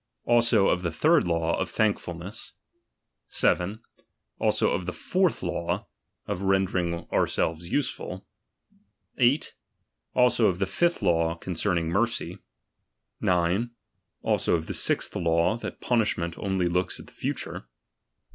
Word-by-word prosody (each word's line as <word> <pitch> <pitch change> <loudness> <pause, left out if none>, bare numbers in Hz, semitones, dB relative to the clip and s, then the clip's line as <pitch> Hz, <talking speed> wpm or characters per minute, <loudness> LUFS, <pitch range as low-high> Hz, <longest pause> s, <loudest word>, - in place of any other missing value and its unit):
Also 115 -4 +4
of 90 - +1
the 85 - -1
third 155 - +3
law, 85 -1 +1
of - - -1
thankfulness. 100 -2 -2 0.7
7. 100 +6 +1 0.6
Also - - +2
of 90 -1 -2
the 90 - -2
fourth 185 - 0
law, 85 -1 -2 0.4
of 90 - -3
rendering 95 -3 0
ourselves 85 +2 0
useful. 125 -9 -2 0.9
8. 130 +5 +3 0.6
Alsoof 120 -7 +4
the 95 - +1
fifth 170 - 0
law, 85 -2 +2
concerning 85 -1 -1
mercy. 85 - -1 0.8
9. 90 +6 +1 0.5
Also - - +2
of 80 -1 -2
the - - -4
sixth - - 0
law, 85 +4 +2
that - - -7
punish 115 -4 +1
ment 85 -1 -3
only 95 -3 0
looks 90 +1 0
at - - -10
the - - -18
future. - - -4
90 Hz, 125 wpm, -27 LUFS, 85-110 Hz, 0.9 s, Also